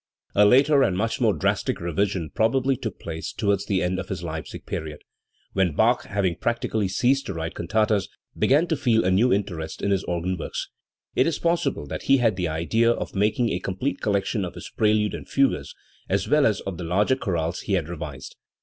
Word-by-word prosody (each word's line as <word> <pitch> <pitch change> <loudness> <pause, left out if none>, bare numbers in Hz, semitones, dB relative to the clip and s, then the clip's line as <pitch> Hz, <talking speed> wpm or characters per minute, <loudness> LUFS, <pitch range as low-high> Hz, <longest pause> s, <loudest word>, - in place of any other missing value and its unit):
A 105 - +5
later 140 +5 +5
and 95 -8 +2
much 115 +6 -1
more 110 -4 +3
drastic 100 +1 0
revision 85 0 -1
probably 130 +4 +2
took 110 -5 -6
place 80 -1 -5
towards 100 -1 0
the 95 -2 +1
end 90 +1 -1
of 90 - -6
his 95 -2 -4
Leipzig 80 -2 -6
period, 75 -2 -5 0.5
when 95 -5 +1
Bach, 120 +6 +3
having 95 -4 -1
practically 110 -3 -1
ceased 130 +8 +1
to 100 - -4
write 80 0 -4
cantatas, 105 -3 0 0.3
began 150 +5 +3
to 165 - 0
feel 120 -7 +2
a 95 - +3
new 115 +7 +3
interest 85 -6 -2
in 100 - -1
his 95 -1 +1
organ 90 +1 -2
works. - - -4 0.5
It 130 - +3
is 165 - 0
possible 170 0 0
that - - -5
he 135 - +5
had 115 -5 +2
the 90 -2 -1
idea 85 +9 +1
of 120 - -1
making 110 +4 +1
a 90 - -1
complete 95 +10 -3
collection 100 +1 0
of 90 - -5
his - - -9
preludes 105 -1 +2
and - - -7
fugues, 135 0 +1 0.3
as - - 0
well 150 0 +4
as 105 - 0
of 95 -3 -6
the - - -4
larger 100 +9 +2
chorales 85 -8 -2
he 100 - -3
had 85 -5 +1
revised. 75 -6 -7
100 Hz, 205 wpm, -24 LUFS, 90-120 Hz, 0.5 s, A